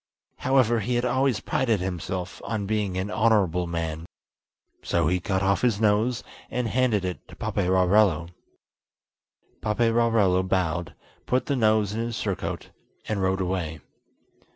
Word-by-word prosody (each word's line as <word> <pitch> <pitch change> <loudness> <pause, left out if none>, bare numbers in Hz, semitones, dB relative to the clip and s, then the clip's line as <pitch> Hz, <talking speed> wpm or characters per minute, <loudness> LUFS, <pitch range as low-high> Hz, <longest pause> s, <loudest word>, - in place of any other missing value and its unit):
However, 130 -3 +3
he 120 +3 -1
had 120 +1 +1
always 130 -2 +1
prided 115 -6 0
himself 90 0 -4
on 110 -3 -3
being 105 -3 -1
an 95 +3 -2
honourable 95 -5 +2
man, 85 -1 -4 0.7
so 85 -1 0
he 90 +4 +1
cut 95 +1 -1
off 100 0 +2
his 115 -5 +2
nose, 110 +3 +2 0.3
and 125 0 -1
handed 115 -5 +1
it 90 -1 -5
to - - -13
Paperarello. 90 -2 +2 1.3
Paperarello 115 -4 +2
bowed, 90 -4 -1 0.3
put 125 +1 +1
the 140 - 0
nose 110 -4 +2
in 110 - -3
his 115 0 -3
surcoat, 100 -3 -4 0.4
and 105 -2 -1
rode 95 0 +1
away. 90 -4 -2
100 Hz, 135 wpm, -25 LUFS, 90-115 Hz, 1.3 s, However